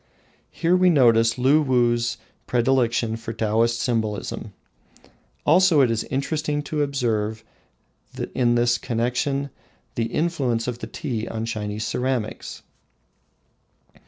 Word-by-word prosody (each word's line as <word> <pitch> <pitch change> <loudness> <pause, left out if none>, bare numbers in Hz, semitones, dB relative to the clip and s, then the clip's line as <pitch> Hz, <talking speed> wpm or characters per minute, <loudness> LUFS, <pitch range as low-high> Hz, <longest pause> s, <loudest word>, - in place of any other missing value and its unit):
Here 170 +2 +1
we 185 0 +4
notice 115 -7 +4
Luwuh's 125 -4 +2 0.3
predilection 120 -2 +1
for 115 0 -6
Taoist 115 +2 +1
symbolism. 110 -4 -2 0.9
Also 180 -5 +5
it 125 -3 +3
is 115 - -1
interesting 150 +2 -2
to 150 +1 -2
observe 115 -6 -1 0.9
in 120 -2 +2
this 120 0 +2
connection 125 +5 -1 0.4
the 115 - -1
influence 130 -6 -1
of 120 -1 -3
tea 115 -4 -4
on 110 0 -4
Chinese 105 -1 -4
ceramics. 125 0 -3
120 Hz, 100 wpm, -23 LUFS, 115-140 Hz, 0.9 s, Also